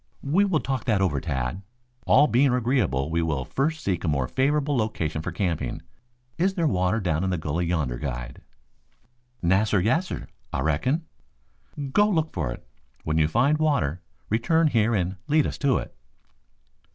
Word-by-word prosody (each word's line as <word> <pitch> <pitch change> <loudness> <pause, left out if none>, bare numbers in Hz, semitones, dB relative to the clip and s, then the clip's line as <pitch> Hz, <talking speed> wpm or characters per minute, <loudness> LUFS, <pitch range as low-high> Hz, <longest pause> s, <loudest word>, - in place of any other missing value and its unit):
"We 175 +9 +3
will 175 -6 +1
talk 135 -2 -3
that 110 -5 +2
over, 85 -8 +1
Tad. 65 +3 -3 0.5
All 145 +3 +6
being 135 0 +3
agreeable 115 - +1
we 85 0 +1
will 75 -6 -1
first 155 - -1
seek 90 -4 -1
a - - -1
more 70 -5 +1
favorable 145 - +1
location 85 -9 -1
for 90 - -4
camping. 85 -8 -2 0.6
Is 190 +2 +2
there 170 -3 0
water 95 -4 +1
down 85 -4 0
in 95 - 0
the 90 - 0
gully 80 +3 -2
yonder, 75 -8 -1
guide?" - - -5 1.0
"Nassir, 100 +4 +3
yassir. 160 - 0 0.2
Ah - - -2
reckon." 105 - 0 0.9
"Go 205 +1 +4
look 160 -5 0
for - - -2
it. - - -9 0.4
When 80 +1 0
you 75 - +4
find 130 - +2
water 140 - +1 0.3
return 155 +9 +2
here 115 -2 +2
and 95 0 -1
lead 155 0 +3
us - - -4
to 140 -3 +2
it." - - -6
100 Hz, 165 wpm, -25 LUFS, -, 1.0 s, All